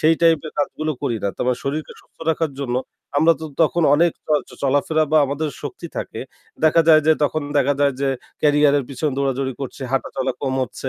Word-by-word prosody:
সেই 160 +1 +5
type 165 -3 +4
এর - - -8
কাজগুলো 155 +1 -1
করি 115 - 0
না। - - +2
তার - - -2
মানে 125 -1 +1
শরীরকে 150 +3 -3
সুস্থ - - -31
রাখার 160 -2 -1
জন্য 125 -3 -1 0.4
আমরা 160 +3 +5
তো - - -5 0.2
তখন 170 +2 +2
অনেক 170 +2 +3 0.4
চ - - -16
চলাফেরা 145 +3 +2
বা 155 - +6
আমাদের 145 +3 -2
শক্তি 380 - -6
থাকে। - - -5 0.4
দেখা 155 +1 +5
যায় 155 -1 +8
যে 160 - +7
তখন 155 +1 -1 0.2
দেখা 140 +1 +2
যায় 140 -1 +3
যে, 140 - +1 0.3
ক্যারিয়ারের 145 -2 +4
পিছনে 140 +2 -2
দৌড়াদৌড়ি 135 -1 -1
করছে, 135 +1 -6
হাঁটাচলা 135 0 -1
কম 130 -1 -1
হচ্ছে, 130 +2 -7
145 Hz, 200 wpm, -21 LUFS, 135-155 Hz, 0.4 s, যায়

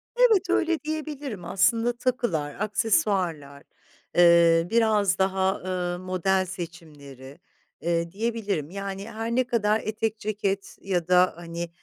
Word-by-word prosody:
Evet, 450 -7 +4
öyle 335 -2 +1
diyebilirim. 295 - -5
Aslında 225 +7 +2
takılar, 235 - -2
aksesuarlar, 195 - 0 0.5
eee, 170 -1 +5
biraz 215 -4 +2
daha, 190 0 +1
ııı, 180 -1 -3
model 185 +1 0
seçimleri, 150 -7 -10 0.4
eee, 170 +1 -1
diyebilirim. 205 -7 -2
Yani, 195 +1 -6
her 225 +1 -4
ne 255 - +3
kadar 220 -2 +1
etek, 220 0 -2
ceket 200 -2 -3
ya 175 -4 -2
da, 180 0 +4
hani, 170 0 -6
195 Hz, 115 wpm, -25 LUFS, 170-225 Hz, 0.5 s, eee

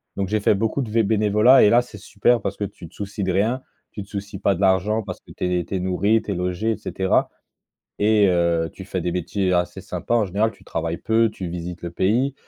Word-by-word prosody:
Donc, 95 -2 -2
j'ai 110 +1 +1
fait 105 - +3
beaucoup 110 +7 -1
de 120 - -4
v 115 +1 +2
bénévolat 105 +4 +5
et 105 - +6
là, 120 +3 +5
c'est 120 -3 -12
super 105 +4 +1
parce - - -3
que - - -4
tu 90 -3 -7
te - - -21
soucies 100 0 -5
de 95 - 0
rien, 110 +7 +1 0.3
tu 105 - -7
te - - -18
soucies 100 -1 -6
pas 100 -1 +2
de 90 - -6
l'argent 95 +3 +2
parce 90 -3 -7
que - - -17
tu 90 -1 0
es 85 - -4
tu 95 - -5
es - - 0
nourri, 100 +5 +1
tu 105 - -5
es - - -2
logé 90 +5 -1
et 110 - -2
cetera 95 -2 0 0.7
et 105 0 +4
heu, 85 -2 +1
tu 95 - -10
fais 95 -1 -3
des 90 - -2
métiers 90 +2 -1
assez 90 0 0
sympa. - - -3
En 115 -2 +3
général, 105 +4 0
tu 100 - -22
travailles 85 0 -3
peu, 115 +1 +2
tu 95 -4 -6
visites 85 +1 -6
le 85 - -4
pays, 115 +10 +1
100 Hz, 255 wpm, -22 LUFS, 90-110 Hz, 0.7 s, et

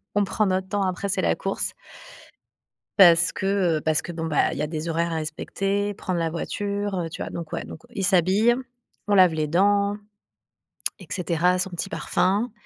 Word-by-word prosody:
on 205 0 +3
prend 210 +2 0
notre 190 0 0
temps, 200 0 -1
après 185 +1 -2
c'est 195 - 0
la - - +2
course - - -3 1.2
parce 170 -3 +7
que, 190 -5 +1
heu, - - -7
parce 155 -1 +1
que 175 - -6
bon, 165 -1 -4
bah, 155 -3 +2
il - - -5
y 150 - 0
a - - 0
des 160 +1 -4
horaires 165 +1 0
à - - -1
respecter, 195 +6 -2
prendre 185 -2 -3
la 165 -1 0
voiture, 200 +4 -3
heu, 165 -2 -3
tu - - -6
vois - - -5
donc 170 -2 -7
ouais - - -3
donc 160 - -10
il 195 - -3
s'habille, 195 +5 +4 0.5
on 205 - +3
lave 180 -3 +6
les 155 -1 -1
dents 200 +4 +2 1.0
et - - -11
cetera, 180 0 +1
son 190 - -1
petit 175 +2 -4
parfum. 205 +3 0
185 Hz, 200 wpm, -24 LUFS, 165-200 Hz, 1.2 s, parce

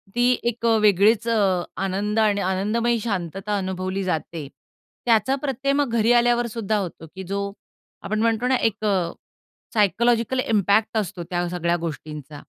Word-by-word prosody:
ती 240 0 +3 0.2
एक 235 0 -5 0.2
वेगळीच 210 +3 +4
अ, 195 -6 +2 0.2
आनंद 205 +3 -1
आणि 205 -2 +2
आनंदमयी 215 +5 0
शांतता 195 -1 -3
अनुभवली 190 0 -3
जाते. 165 -4 -3 0.6
त्याचा 235 +2 +3
प्रत्यय 275 0 0
मग 285 -2 +1
घरी 225 +1 +3
आल्यावर 240 0 +3
सुद्धा 220 -2 -1
होतो 175 -4 -5
की 190 - -6
जो 200 +1 -2 0.5
आपण 215 +1 -2
म्हणतो 230 +1 +1
ना 260 - +3
एक 215 0 -8
अ, 185 -5 +1 0.6
सायकॉलॉजिकल 235 +3 +2
इम्पॅक्ट 215 -1 +2
असतो, 180 -4 -2
त्या 175 +1 -2
सगळ्या 170 -1 0
गोष्टींचा. 150 -2 -7
205 Hz, 145 wpm, -23 LUFS, 185-230 Hz, 0.6 s, वेगळीच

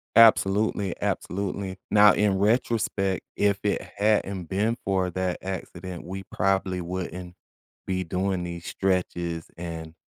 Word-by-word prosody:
Absolutely, 105 -3 +5
absolutely. 95 0 -2
Now 105 0 +7
in 100 -2 +2
retrospect, 105 -3 +1
if 100 -1 +2
it 105 - +1 0.2
hadn't 100 -3 +1
been 105 +6 0
for 95 -2 +1
that 95 0 -1
accident, 90 -1 -6
we 95 +2 -6
probably 95 -1 0
wouldn't 90 0 -5 0.5
be 95 -1 0
doing 90 +1 -1
these 85 -1 -6
stretches 85 -3 -1
and 80 -2 -6
95 Hz, 120 wpm, -26 LUFS, 90-100 Hz, 0.5 s, Now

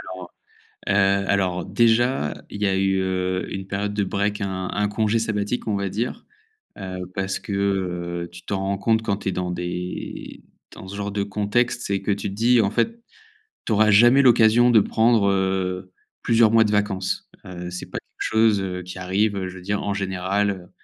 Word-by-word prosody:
alors, 90 -1 -10 0.6
heu - - +2
heu, 100 -1 +2
alors 95 -3 +1
heu, - - -8
déjà, 120 - +2 0.2
il 105 - -7
y - - +3
a 95 -1 +1
eu, 95 0 +1
heu, 95 0 -2
une 95 0 -5
période 100 +1 -2
de 105 -1 0
break, 100 +2 -1
un 95 -1 -3
un 105 0 +1
congé 110 +1 0
sabbatique, 110 +1 -2
on 105 - 0
va 100 0 -1
dire, 115 - -4 0.5
heu, 95 -2 -6 0.2
parce 95 0 -2
que, - - -11 0.7
heu, 85 - -6
tu 90 0 -12
t'en 100 +2 -3
rends 100 0 -1
compte 110 +2 +1
quand 105 -3 -1
tu 95 - -2
es - - -5
dans 90 0 -2
des 90 +1 -5 0.3
dans 95 - -11
ce 95 - -8
genre 100 0 -3
de 100 0 -1
contexte, 105 +5 0
c'est 100 -1 -1
que 100 +1 -1
tu 100 +1 -2
te 95 - -7
dis: 120 +2 +4
«En 100 - +2
fait, 230 - -1 0.7
tu 115 - 0
auras 110 +1 +4
jamais 120 +7 +6
l'occasion 120 -1 +5
de 115 -3 +6
prendre 110 -1 +3
heu, 95 -1 -1 0.3
plusieurs 115 -1 +4
mois 115 0 +5
de 105 - -1
vacances». 100 -2 -1 0.2
Heu, 90 -1 -7
c'est 90 - -6
pas - - -4
quelque - - -9
chose, 110 -3 +3
heu, 90 -1 -4
qui 90 +1 -9
arrive, 100 +3 0
heu, 95 -1 -2
je 90 - -8
veux 90 - -9
dire 100 +2 -2
en 100 - -1
général, 95 -1 -2
100 Hz, 205 wpm, -23 LUFS, 95-110 Hz, 0.7 s, jamais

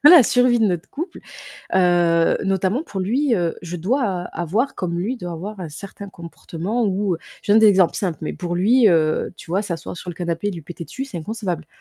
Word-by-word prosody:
la 320 0 +10
survie 245 +1 +4
de 220 - +4
notre 175 -1 -2
couple, 330 +6 -6 0.5
heu, 175 -2 +4
notamment 195 - +1
pour 195 - -5
lui, 245 +7 +1
heu, 170 -5 0
je 175 0 -6
dois 230 - 0
a 185 -3 -2 0.2
avoir, 215 - 0
comme 175 -2 -3
lui, 205 +9 -1
il - - -9
doit 175 -5 -5
avoir, 195 +5 -6
un 175 - -5
certain 195 +5 -9
comportement 175 +5 -4
où, 195 -1 0
heu, - - -18 0.2
je - - -15
te - - +6
donne 220 - +7
des 220 - +7
exemples 190 -4 +4
simples 180 -5 -2
mais - - -2
pour 175 -1 -4
lui, 225 +7 +4
heu, 155 -3 +2
tu - - -12
vois, 190 +3 +2
s'asseoir 175 -5 -5
sur 180 - -9
le - - -8
canapé 170 +3 -2
et - - 0
lui 170 -3 -7
péter 170 +2 -8
dessus, 265 +10 -5
c'est 205 -10 -6
inconcevable. 180 -3 -4
185 Hz, 235 wpm, -21 LUFS, 170-220 Hz, 0.5 s, la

